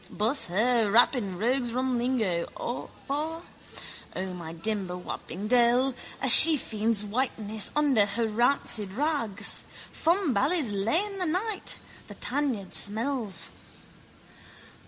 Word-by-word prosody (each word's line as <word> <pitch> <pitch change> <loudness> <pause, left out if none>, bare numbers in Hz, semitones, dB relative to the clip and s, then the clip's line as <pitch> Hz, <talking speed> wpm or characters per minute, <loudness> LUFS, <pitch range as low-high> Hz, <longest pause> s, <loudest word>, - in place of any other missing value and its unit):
Buss 230 +7 -2
her, 220 +3 0
wap 240 +5 +4
in 200 -7 -5
rogues' 240 +3 -2
rum 255 -1 -2
lingo, 220 -9 -2 0.6
for, 315 +4 -4 0.7
O, 185 0 -5
my 170 -3 -9
dimber 185 +1 -3
wapping 180 +2 -8
dell! 245 +2 +2 0.3
A - - +1
shefiend's 225 -8 +8
whiteness 220 -2 -3
under 275 -9 +2
her 225 +3 -3
rancid 220 -3 -1
rags. 230 -7 -1 0.3
Fumbally's 320 - 0
lane 335 - -1
that 365 - -1
night: 400 +6 -3 0.3
the - - -12
tanyard 255 -9 -3
smells. 215 -5 -1
235 Hz, 110 wpm, -26 LUFS, 205-275 Hz, 0.7 s, shefiend's